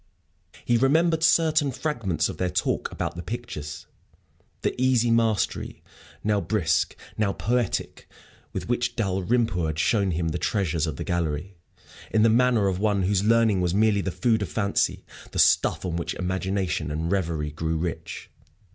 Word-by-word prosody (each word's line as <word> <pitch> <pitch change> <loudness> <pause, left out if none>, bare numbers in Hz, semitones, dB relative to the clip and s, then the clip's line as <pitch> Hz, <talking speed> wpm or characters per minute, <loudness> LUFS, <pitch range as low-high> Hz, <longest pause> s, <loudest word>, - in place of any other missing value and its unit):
He 120 - +3
remembered 160 +6 +3
certain 155 -3 +3
fragments 125 - -1
of - - -6
their 90 - 0
talk - - -1
about - - -4
the 85 - -5
pictures 85 -8 -6 0.8
the - - +1
easy 125 -2 +3
mastery, 115 -2 0 0.4
now 105 -1 +1
brusque, 85 -3 0 0.2
now 100 -2 +1
poetic, 120 -4 -2 0.4
with - - -5
which 120 0 -1
Dalrymple 95 -2 0
had 80 -1 -3
shown 100 +2 +2
him 85 -1 -1
the 90 - -3
treasures 85 -7 0
of 75 - -3
the - - -5
gallery, 85 +2 -2 0.5
in 110 -1 +3
the 115 - +5
manner 120 -2 +3
of 95 -1 -1
one 100 -2 +1
whose 95 +1 +1
learning 110 -3 +3
was 90 0 0
merely 105 -1 +3
the 95 - -2
food 110 +3 +1
of 100 - -3
fancy, 100 -2 0 0.3
the - - -4
stuff - - +3
on 85 -2 -2
which 85 - -3
imagination 95 -3 -2
and 80 +3 -2
reverie 80 -6 -1
grew 80 +2 -2
rich. 85 +1 -5
100 Hz, 160 wpm, -25 LUFS, 85-115 Hz, 0.8 s, the